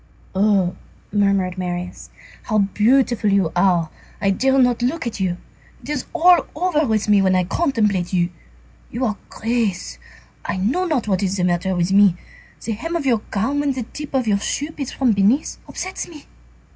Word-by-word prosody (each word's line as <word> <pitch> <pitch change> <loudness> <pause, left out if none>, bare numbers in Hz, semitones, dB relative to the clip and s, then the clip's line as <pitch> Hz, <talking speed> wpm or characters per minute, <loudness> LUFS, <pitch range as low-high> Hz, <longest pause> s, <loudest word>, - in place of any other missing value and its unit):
"Oh!" 190 -2 +2 0.4
murmured 195 -3 +1
Marius, 180 0 -5 0.4
"how 215 - 0
beautiful 215 +2 +2
you 195 -5 +2
are! 175 -3 +2 0.3
I 195 -2 +2
dare 265 +7 +2
not 245 -2 +3
look 255 +5 -1
at 235 - -4
you. 180 -2 -1 0.5
It - - -10
is 300 - -2
all 350 +1 +5
over 310 -3 +1
with 220 -2 0
me 205 -1 +5
when 190 -1 +3
I 185 - +3
contemplate 210 - 0
you. 175 -2 +1 0.6
You 250 +3 -2
are 215 - 0
a - - -19
grace. 220 - -2 0.4
I - - -3
know 245 - 0
not 300 -10 -1
what 190 -2 +1
is 195 0 -1
the 180 - 0
matter 180 +1 0
with 175 +1 0
me. 200 -3 +6 0.5
The 230 - -2
hem 295 +11 -4
of 325 -4 -2
your 235 -5 +2
gown, 225 +8 -1
when 285 -1 +1
the 255 -2 -3
tip 285 +5 -8
of 260 -2 +1
your 200 -2 +2
shoe 290 +8 -3
peeps 275 -4 -5
from 260 -3 +1
beneath, 210 +8 +1
upsets 375 +1 -5
me. 310 -4 -13
210 Hz, 185 wpm, -21 LUFS, 190-265 Hz, 0.6 s, me